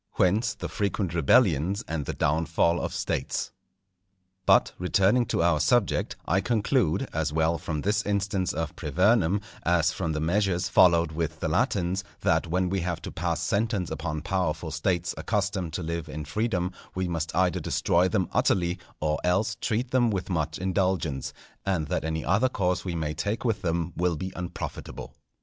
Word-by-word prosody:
Whence, 105 +6 +2
the - - -5
frequent 100 -3 -2
rebellions 85 - +3
and 80 -3 -3
the - - -2
downfall 80 +3 +1
of - - -2
States. - - -2 1.0
But, - - +5
returning 100 +6 +3
to 95 - +1
our 85 -3 +3
subject, 105 +7 +2
I 95 +4 +2
conclude, 115 - +1
as 75 -1 0
well 80 +2 +1
from 75 -3 -3
this 105 +3 +1
instance 100 -2 0
of 80 0 -3
Privernum, 90 - +2 0.2
as 85 -1 +2
from 80 -3 -2
the 75 - -2
measures 90 +2 +1
followed 85 -2 +5
with 80 -1 -3
the - - -1
Latins, 95 +1 0 0.2
that 80 +1 +2
when 90 +2 +1
we 95 +2 0
have 85 -1 -2
to - - -5
pass - - -2
sentence 100 -5 0
upon 75 -1 -3
powerful 85 -3 -1
States 85 +2 0
accustomed 100 -5 -1
to 90 - -3
live 85 0 -4
in 75 0 -5
freedom, 90 +2 -1 0.2
we 95 0 -1
must 85 -2 -3
either 90 -1 +2
destroy 90 +2 +2
them 95 -3 0
utterly, 90 0 +1 0.2
or 75 0 0
else 100 +6 +1
treat 120 +2 -1
them 125 -2 +3
with 95 -2 -2
much 80 -3 -1
indulgence; 90 -7 -1 0.3
and 90 -6 -1
that - - -1
any 80 0 -2
other 115 +7 +3
course 90 -6 0
we 90 -3 -3
may 80 -2 -2
take 105 +8 -2
with 110 -4 0
them 85 -1 -1
will 90 -1 +1
be 95 +5 -5
unprofitable. 90 -1 -6
90 Hz, 170 wpm, -27 LUFS, 80-100 Hz, 1.0 s, But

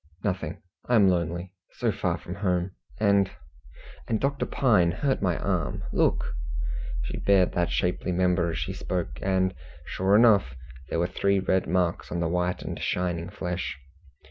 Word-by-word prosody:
"Nothing! 90 -5 -3 0.3
I 125 - +4
am 100 -4 +6
lonely. 85 +1 -1 0.2
So - - 0
far - - -1
from 90 - -8
home; 90 -2 0 0.3
and 100 -2 +4 0.8
and 110 - 0
Dr. 140 0 0
Pine 105 -10 +3
hurt 135 +7 0
my 90 -4 +1
arm. - - -1
Look!" - - +1 0.7
She - - -4
bared 95 -2 +4
that 85 -1 0
shapely 90 0 0
member 90 -1 +2
as 80 - -3
she - - -3
spoke, - - -3
and 95 -1 +1 0.3
sure 95 +2 +2
enough 105 - +5 0.3
there - - -1
were 85 - +2
three 100 +2 +1
red 95 0 +1
marks 90 0 0
on 85 - -1
the 85 - +1
white 90 +1 -1
and - - -5
shining 90 -1 -1
flesh. 90 -5 -4
90 Hz, 160 wpm, -27 LUFS, 85-100 Hz, 0.8 s, am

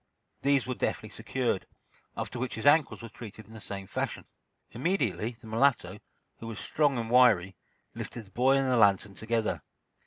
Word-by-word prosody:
These 140 -2 +3
were 130 - -2
deftly - - -2
secured, - - -2 0.5
after 120 - -4
which 125 +1 -3
his 110 - -6
ankles 145 -4 +4
were 115 - -7
treated 110 0 -10
in 110 - -15
the 110 - -9
same 100 0 -6
fashion. - - -3 0.5
Immediately 125 - -1
the 125 - -16
mulatto, 120 +4 +1 0.4
who 115 - -7
was 115 - -6
strong 145 -4 +1
and 115 -1 -3
wiry, 105 -7 +5 0.4
lifted 120 - -6
the 95 - -21
boy 130 +5 +3
and 135 -1 +1
the 130 -1 +2
lantern 100 -2 +4
together. 115 +1 -1
115 Hz, 175 wpm, -29 LUFS, 110-130 Hz, 0.5 s, wiry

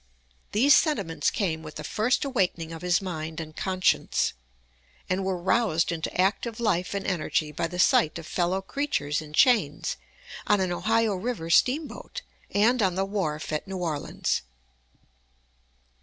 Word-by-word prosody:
These 270 +7 +5
sentiments 200 - +2
came 165 -6 -1
with 155 -1 -10
the - - -6
first 245 +6 0
awakening 180 -11 -1
of 165 - -7
his 180 +1 +1
mind 160 -3 -5
and 155 -1 -7
conscience, 185 -1 +1 0.7
and 185 +1 0
were 190 -1 -1
roused 180 -2 +1
into 165 +1 -4
active 205 +5 +1
life 200 -5 0
and 200 - -3
energy 155 -4 -1
by 165 +3 -2
the 180 - -7
sight 160 -3 +4
of 165 - -8
fellow 180 +3 -1
creatures 190 - -1
in 150 -1 -11
chains 165 - +3 0.5
on 205 -1 +4
an 185 -2 0
Ohio 225 +4 +1
River 185 -4 -3
steamboat, 285 - +1 0.3
and 230 +4 +3
on 185 -3 +2
the 190 +1 0
wharf 180 -8 -3
at 150 - -2
New 190 0 -5
Orleans. 160 -5 -2
185 Hz, 150 wpm, -26 LUFS, 165-215 Hz, 0.7 s, These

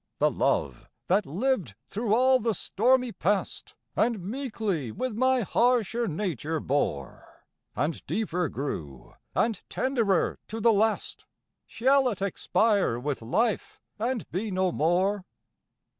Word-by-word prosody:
The - - +3
love 65 -3 -1 0.2
that 195 +3 +2
lived 185 - -1
through 220 0 0
all 260 +2 +5
the 225 -2 0
stormy 250 +7 +2
past, 205 -1 -2 0.2
And 230 -1 +2
meekly 205 - -3
with 255 - -3
my 255 +3 +2
harsher 235 +1 +2
nature 160 - -2
bore, 130 - -3 0.3
And 155 +2 -1
deeper 180 -7 -1
grew, 80 - -6 0.2
and 225 -4 +1
tenderer 230 -9 +1
to 225 - -5
the 225 +1 +4
last, 215 +1 0 0.4
Shall 265 +2 +3
it 210 - -4
expire 200 - +1
with 135 +2 -3
life, 215 - -1 0.2
and 235 0 -2
be 205 +5 -2
no 185 -1 +1
more? 185 +6 +1
205 Hz, 125 wpm, -27 LUFS, 170-235 Hz, 0.4 s, all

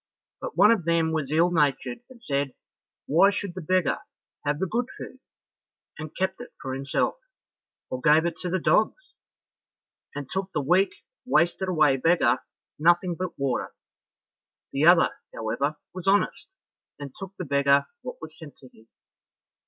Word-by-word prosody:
But - - -7
one 210 - +7
of 205 -8 +1
them 165 -1 +2
was 155 -4 -2
ill 170 +3 +3
natured 140 -6 +1
and 240 -3 -16
said, 140 - -1 0.5
"Why 175 +7 +5
should 200 -2 -4
the 185 - -6
beggar 185 +1 +1 0.4
have 145 0 0
the 190 - -1
good 235 +6 -1
food?" 260 - -9 0.8
and 155 -1 -7
kept 190 +3 -2
it 245 - -11
for 130 - -5
himself, 135 - -1 0.7
or 130 - -3
gave 155 +4 +5
it 170 -1 -1
to 180 - -4
the 185 - +1
dogs, 220 - +1 1.0
and 145 -2 -5
took 190 +4 -3
the - - +2
weak, 180 +7 +3 0.3
wasted 175 -3 +1
away 155 -6 +3
beggar 130 -4 +3 0.4
nothing 175 +3 +3
but 180 +1 -5
water; 135 -3 -2 1.0
the 145 +4 +2
other, 175 -1 +6 0.2
however, 140 +7 -2 0.2
was 185 0 -7
honest, 200 - +1 0.5
and 140 -2 -8
took 195 0 -8
the 180 - -4
beggar 140 0 +3 0.2
what - - -8
was 155 0 -9
sent 155 -3 -12
to 130 - -16
him. 110 -1 -22
165 Hz, 160 wpm, -26 LUFS, 140-185 Hz, 1.0 s, one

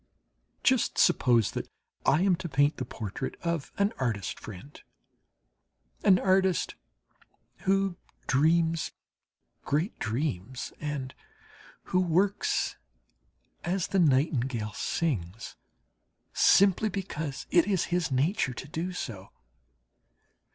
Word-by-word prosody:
Just 260 -3 +2
suppose 120 -4 +4
that - - -5 0.4
I 155 +6 +4
am 190 -2 +4
to 175 -1 -6
paint 145 +2 +2
the 130 - -3
portrait 120 +2 -5
of 170 -4 -2
an 200 +2 +2
artist 110 -7 -2
friend 110 +8 -11 1.2
an 185 - +6
artist 190 -1 +2 0.9
who 195 -2 +2 0.3
dreams 160 +3 +2 0.7
great 155 +8 -1
dreams 120 - -3
and 145 -4 -4 0.8
who 185 - +5
works 185 +3 +1 0.9
as 180 +1 -1
the 195 - +1
nightingale 130 - +1
sings, 115 - -2 0.8
simply 200 +2 +5
because 160 -7 -4
it 175 +1 +5
is 190 -4 +2
his 175 -5 0
nature 135 - +1
to 130 - -7
do 170 +5 -4
so. 100 - -6
155 Hz, 100 wpm, -28 LUFS, 130-185 Hz, 1.2 s, an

